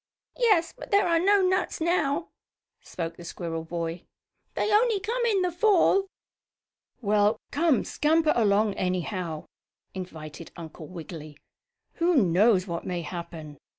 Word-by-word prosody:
"Yes, 405 -9 +3
but - - -10
there 400 0 +4
are 335 -1 +3
no 395 +2 +4
nuts 375 +1 0
now," 325 -1 0 0.5
spoke 165 -1 -6
the 175 - -10
squirrel 165 -1 -5
boy. 170 0 -4 0.5
"They 425 - 0
only 440 -1 +3
come 470 +5 -2
in 400 -5 +2
the 360 - 0
Fall." 390 +1 +3 1.0
"Well, 210 +1 +2
come, 310 -3 +2
scamper 310 +1 +2
along, 210 -2 +3
anyhow," 180 -3 -2 0.5
invited 165 -4 -8
Uncle 160 -1 -9
Wiggily. 160 -4 -9 0.6
"Who 345 +1 +2
knows 195 - +4
what 170 -3 -4
may 175 -2 -3
happen? 160 -4 -8
210 Hz, 130 wpm, -26 LUFS, -, 1.0 s, there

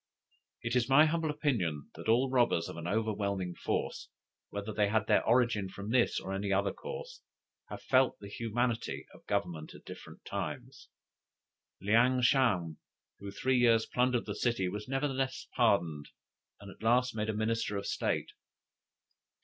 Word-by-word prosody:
"It 120 +1 -1
is 125 0 +2
my 145 +4 +7
humble 160 0 0
opinion 115 - -1
that - - -6
all 125 +3 +3
robbers 120 -10 +2
of - - -7
an 85 0 -6
overpowering 100 -3 -1
force, - - -3 0.4
whether 100 +1 -5
they 105 -1 +2
had 110 0 +1
their - - +3
origin 115 -5 +2
from 100 +3 -6
this 125 -1 +3
or 95 - -5
any 100 +1 -2
other 100 +1 +1
cause, 480 +1 -8 0.5
have - - -8
felt 130 -1 +3
the 100 - -9
humanity 115 +2 -2
of - - -17
Government 80 -3 -2
at - - -15
different - - -11
times. - - -6 0.9
Leang 125 +5 +3
sham, 100 - +2 0.4
who 100 - -7
three 125 +4 +1
times 115 -2 +4
plundered 125 -1 +1
the 105 - -3
city, 110 -3 0
was 105 +3 -5
nevertheless 135 -1 -2
pardoned, 85 -11 +2 0.5
and 100 0 -10
at - - -17
last 125 +2 +2
made 110 0 -2
a - - 0
minister 110 -1 -1
of 100 - -4
state. - - -1
115 Hz, 155 wpm, -31 LUFS, 100-125 Hz, 0.9 s, my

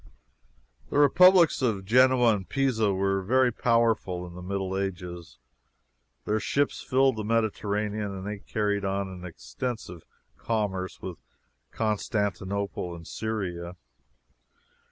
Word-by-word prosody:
The - - -1
republics 175 +3 +6
of 105 -7 0
Genoa 125 0 +5
and 95 -2 -7
Pisa 125 -7 +1
were 95 0 0
very 125 +5 +3
powerful 115 -6 +1
in 90 - -10
the 90 - -9
Middle 95 0 -3
Ages. 90 -4 -5 0.9
Their 110 - +1
ships 140 +6 0
filled 130 -2 +2
the 110 - -3
Mediterranean, 105 -1 -1
and 95 0 -7
they 105 0 -4
carried 105 -1 -1
on 100 0 -1
an 90 -1 -9
extensive 85 - -6 0.4
commerce 100 -5 -2
with 90 -3 -6 0.5
Constantinople 100 -4 -2
and 85 -1 -11
Syria. 90 -6 -4
100 Hz, 115 wpm, -27 LUFS, 95-115 Hz, 0.9 s, republics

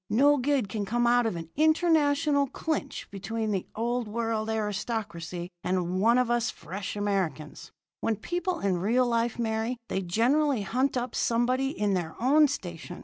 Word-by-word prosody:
No 285 +6 +5
good 270 -3 +1
can 210 +1 -3
come 240 +4 0
out 240 0 +4
of 220 - -2
an 165 -1 -7
international 300 -2 +3
clinch 295 0 -3
between 215 +2 -3
the 190 -3 -2
Old 240 +1 -1
World 225 0 -2
aristocracy 210 -5 -3
and 180 0 0
one 230 +3 +5
of 250 -1 +2
us 240 -1 +1
fresh 195 +3 -6
Americans. 195 -7 -2 0.3
When 225 - 0
people 350 - -3
in 190 -3 +1
real 235 +7 +2
life 235 -1 0
marry, 225 +1 -1
they 190 - -1
generally 240 - +2
hunt 255 +6 0
up 245 -1 -3
somebody 250 +3 +1
in 210 -6 0
their 170 -4 -2
own 295 +5 +5
station. 175 - -6
230 Hz, 160 wpm, -28 LUFS, 200-255 Hz, 0.3 s, No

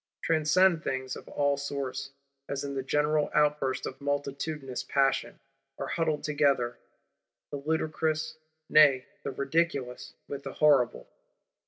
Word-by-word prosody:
Transcendent 165 +2 +3
things 130 0 -3
of - - -11
all 145 -1 +1
sorts, 140 -1 -4 0.4
as 140 -1 -2
in 140 -1 -4
the 135 - -2
general 150 +2 +1
outburst 150 -3 +2
of 130 +1 -7
multitudinous 140 -1 -3
Passion, 135 -1 +1 0.4
are - - -4
huddled 160 -3 0
together; 140 -5 +1 0.7
the 145 - -3
ludicrous, 155 +1 -1 0.3
nay 140 -4 +6 0.2
the - - -4
ridiculous, 140 -2 -1
with 140 -1 -5
the 135 -1 -7
horrible. 130 - +3
145 Hz, 125 wpm, -29 LUFS, 135-155 Hz, 0.7 s, nay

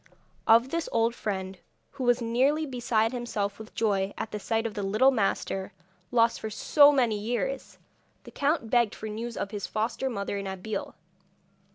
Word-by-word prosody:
Of 230 +3 +6
this 335 +2 -2
old 230 0 +2
friend, 190 -4 -4 0.3
who 275 -2 -6
was 245 0 +3
nearly 265 +7 +2
beside 235 -4 0
himself 220 -5 -3
with 220 0 -11
joy 200 -3 0
at - - -4
the 210 - -4
sight 225 +2 -1
of 225 - -2
the 205 - -4
little 215 +7 +4
master, 195 -4 -1 0.4
lost 230 -1 +3
for 220 - -4
so 290 +7 +5
many 240 -7 +2
years, 245 - -3 0.5
the - - -12
count 285 -5 0
begged 235 -4 +3
for 220 - -6
news 230 +2 -5
of 200 - -3
his 205 -2 -4
foster 230 +5 -1
mother 200 -3 -3
and 200 - -5
Abeille. 190 +2 -5
225 Hz, 175 wpm, -28 LUFS, 205-245 Hz, 0.5 s, Of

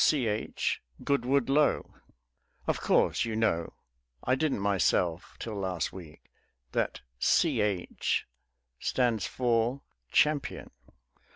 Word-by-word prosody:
Ch. 115 -8 +1 0.2
Goodwood 140 -1 +2
Lo. 145 +2 +2 0.7
Of - - 0
course - - +3
you 115 -2 -2
know 85 -7 +1 0.5
(I 130 - +2
didn't 135 -3 +1
myself 95 -3 +1
till 115 - -5
last 95 -4 -2
week) 80 -5 -11 0.5
that - - -1 0.2
"Ch." 100 -4 +1 0.5
stands 120 -6 +1
for 120 +1 +1 0.3
"Champion." 150 -2 +1
115 Hz, 95 wpm, -29 LUFS, 95-130 Hz, 0.7 s, course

